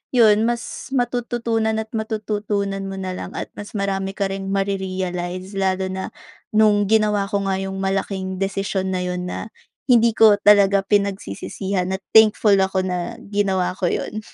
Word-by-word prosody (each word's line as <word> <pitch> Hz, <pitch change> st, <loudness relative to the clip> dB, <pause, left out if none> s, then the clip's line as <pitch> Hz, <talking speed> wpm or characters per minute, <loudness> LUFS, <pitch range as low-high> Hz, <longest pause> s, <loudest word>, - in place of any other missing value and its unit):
’yon, 220 Hz, -2 st, +5 dB
mas 235 Hz, -1 st, -4 dB
matututunan 235 Hz, -2 st, 0 dB
at -, -, -21 dB
matututunan 210 Hz, -2 st, -2 dB
mo 195 Hz, -, -5 dB
na 185 Hz, -1 st, -4 dB
lang -, -, -6 dB
at -, -, -4 dB
mas 205 Hz, -, -8 dB
marami 195 Hz, -1 st, -1 dB
ka 200 Hz, -1 st, 0 dB
ring 195 Hz, 0 st, -5 dB
ma-re-realize, 185 Hz, -2 st, -2 dB
lalo 190 Hz, -1 st, 0 dB
na 190 Hz, 0 st, -5 dB, 0.4 s
no'ng 210 Hz, -1 st, +5 dB
ginawa 210 Hz, -2 st, +2 dB
ko 200 Hz, -1 st, -1 dB
nga 190 Hz, 0 st, 0 dB
’yong 195 Hz, 0 st, -4 dB
malaking 190 Hz, -1 st, -2 dB
desisyon 195 Hz, -1 st, -1 dB
na 185 Hz, -1 st, -1 dB
’yon 180 Hz, 0 st, -3 dB
na, 195 Hz, -, -5 dB, 0.4 s
hindi 235 Hz, -2 st, +5 dB
ko 220 Hz, -2 st, +7 dB
talaga 200 Hz, -1 st, +5 dB
pinagsisisihan, 195 Hz, -, -1 dB
at 190 Hz, -, -9 dB
thankful 215 Hz, -1 st, +6 dB
ako 190 Hz, 0 st, +1 dB
na 180 Hz, -2 st, -3 dB, 0.2 s
ginawa 195 Hz, -3 st, +1 dB
ko 185 Hz, -2 st, -1 dB
’yon. 215 Hz, -, -3 dB
195 Hz, 155 wpm, -21 LUFS, 190-210 Hz, 0.4 s, ko